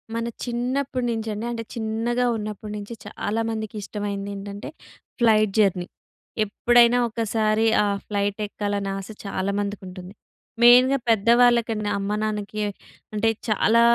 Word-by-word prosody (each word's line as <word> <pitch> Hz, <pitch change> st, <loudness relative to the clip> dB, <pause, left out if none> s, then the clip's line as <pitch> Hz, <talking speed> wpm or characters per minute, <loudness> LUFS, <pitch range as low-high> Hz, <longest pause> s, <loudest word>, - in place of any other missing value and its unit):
మన 230 Hz, 0 st, -2 dB, 0.2 s
చిన్నప్పటినుంచండి 240 Hz, -3 st, -2 dB
అంటే 230 Hz, -1 st, -4 dB
చిన్నగా 230 Hz, +2 st, -1 dB
ఉన్నప్పటి 210 Hz, -1 st, -5 dB
నుంచి 205 Hz, +3 st, -7 dB
చాలామందికి 220 Hz, 0 st, -3 dB
ఇష్టమైంది 200 Hz, -1 st, -4 dB
ఏంటంటే 200 Hz, +1 st, -7 dB, 0.5 s
ఫ్లైట్ 215 Hz, -3 st, +4 dB
జర్నీ. 185 Hz, -4 st, +2 dB, 0.6 s
ఎప్పుడైనా 240 Hz, +3 st, +4 dB
ఒకసారి 220 Hz, -1 st, +1 dB, 0.2 s
ఆ -, -, +1 dB, 0.2 s
ఫ్లైట్ 205 Hz, 0 st, -1 dB
ఎక్కాలని 205 Hz, -1 st, -3 dB
ఆశ 195 Hz, 0 st, -7 dB, 0.2 s
చాలామందికి 200 Hz, +1 st, -2 dB
ఉంటుంది. 185 Hz, +1 st, -9 dB, 0.5 s
మెయిన్‌గా 250 Hz, +3 st, +7 dB
పెద్దవాళ్ళకన్నా 230 Hz, -1 st, +3 dB
అమ్మ 200 Hz, +1 st, -2 dB
నాన్నకి 215 Hz, 0 st, -3 dB, 0.5 s
అంటే 225 Hz, +2 st, +2 dB, 0.2 s
చాలా 225 Hz, +2 st, +3 dB
215 Hz, 110 wpm, -24 LUFS, 205-235 Hz, 0.6 s, మెయిన్‌గా